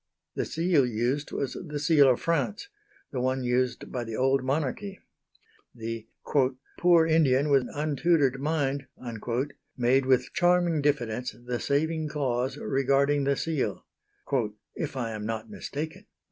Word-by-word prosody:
The - - -2
seal 165 -3 +2
used 125 +5 -1
was 140 - -2
the 150 -4 -5
seal 145 -2 +5
of 125 - +3
France, 170 - -1 0.4
the 130 - -2
one 130 +1 0
used 125 0 0
by 125 -2 -2
the 115 -1 -5
old 135 +1 +2
Monarchy. 155 +9 -2 0.8
The 115 -1 -5 0.7
"poor 175 -2 +6
Indian 150 -3 +3
with 135 -3 +4
untutored 145 -2 +1
mind" 140 -2 -1 0.9
made 130 +2 +3
with 130 -1 +2
charming 175 -3 +3
diffidence 125 -4 -1
the 120 -1 -2
saving 155 +2 0
clause 130 -2 -1
regarding 140 +1 +2
the 140 0 +2
seal, 140 -12 -2 0.9
"if 145 -4 -4
I 115 -3 -2
am 105 -1 -5
not 110 0 -4
mistaken." 160 +8 -6
140 Hz, 130 wpm, -27 LUFS, 125-155 Hz, 0.9 s, poor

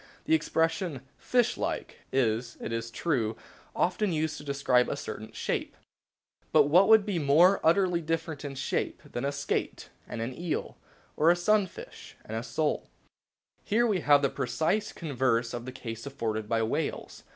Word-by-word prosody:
The 320 - +2
expression 165 - 0
"fish 245 -2 +1
like" - - -3
is, 120 -2 0
it - - -4
is 115 0 -3
true, 115 -5 -1 0.4
often 185 +3 +1
used 155 -1 -1
to - - -9
describe 140 -3 +2
a - - -1
certain - - -7
shape; - - -3 0.7
but - - +6
what 175 +7 +5
could 220 -2 +6
be 200 -5 -1
more 165 +7 +5
utterly 175 +1 +3
different 160 -2 -3
in 140 -1 -5
shape 135 - -2
than 120 - -5
a 140 - 0
skate 140 0 -3 0.2
and - - -6
an 120 +3 -3
eel, 175 -1 -3 0.4
or 160 - +4
a 175 - +6
sunfish 210 - -1
and - - -6
a - - -1
sole? - - -2 0.7
Here 230 +3 +2
we 210 -5 +1
have 145 -3 +4
the 140 - +2
precise 160 - -1
converse 125 -6 0
of 120 0 -5
the 130 - -5
case 115 -1 -7
afforded 110 -6 -3
by 115 -1 +2
whales. 110 - -3
145 Hz, 165 wpm, -29 LUFS, 125-180 Hz, 0.7 s, but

